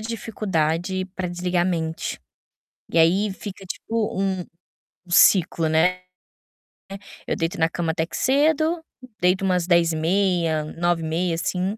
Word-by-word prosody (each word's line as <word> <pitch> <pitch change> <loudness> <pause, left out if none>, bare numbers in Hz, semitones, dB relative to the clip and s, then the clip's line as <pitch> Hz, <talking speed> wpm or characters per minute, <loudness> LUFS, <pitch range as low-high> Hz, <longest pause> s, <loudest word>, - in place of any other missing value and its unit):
dificuldade 190 -5 -2
pra 185 -1 -3
desligar 175 0 -1
a - - +1
mente. 165 -3 -3 0.7
E - - 0
aí 190 +5 +4
fica 195 0 -9
tipo 220 +2 -3
um 190 -2 -1 0.6
um - - -14
ciclo, 170 -2 +4
né. 175 +4 +2 1.3
Eu - - 0
deito 165 0 -3
na 160 - +3
cama, 165 -1 -2
até 160 0 -1
que - - -6
cedo, 315 +4 +2 0.4
deito 185 +2 +2
umas 180 -2 +1
22h30, 170 -1 +2
21h30 165 +1 -1
assim, 185 +5 -2
180 Hz, 125 wpm, -23 LUFS, 165-195 Hz, 1.3 s, aí